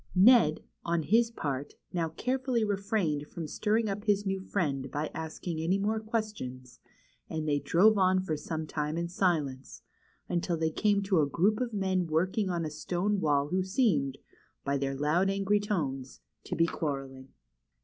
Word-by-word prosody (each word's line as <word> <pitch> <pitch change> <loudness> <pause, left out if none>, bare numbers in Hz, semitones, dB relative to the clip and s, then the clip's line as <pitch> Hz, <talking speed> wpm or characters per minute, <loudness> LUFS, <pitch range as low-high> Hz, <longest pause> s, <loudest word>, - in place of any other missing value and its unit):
Ned, 190 -5 +6 0.2
on 170 -1 0
his 230 +7 +3
part, 145 - -4 0.2
now 165 -2 0
carefully 255 - -1
refrained 200 -8 -1
from 165 +1 -6
stirring 215 +8 0
up 205 +1 -4
his 205 -1 +2
new 195 0 -1
friend 140 -9 -2
by 150 +3 -3
asking 160 +1 -5
any 180 +4 +2
more 215 +2 0
questions, 210 - -4 0.5
and 155 -1 -3
they 145 -1 +2
drove 200 +8 +4
on 185 0 +4
for 185 -4 -2
some 160 +1 -4
time 150 +1 -2
in 170 0 -1
silence, 155 -8 -1 0.4
until 175 -1 -1
they 160 0 0
came 205 +2 +2
to 190 -4 +3
a 145 - +2
group 205 - +2
of 245 -2 -1
men 190 -4 0
working 185 +6 +1
on 170 -2 -1
a 155 - -4
stone 185 +6 -1
wall 145 -3 +2
who 185 +1 +1
seemed, 185 - +1 0.5
by 140 0 +1
their 135 0 -1
loud, 155 +7 +2
angry 195 +1 +2
tones, 140 - -3 0.3
to - - -3
be 165 - +4
quarrelling. 135 -5 -4
175 Hz, 170 wpm, -30 LUFS, 150-205 Hz, 0.5 s, Ned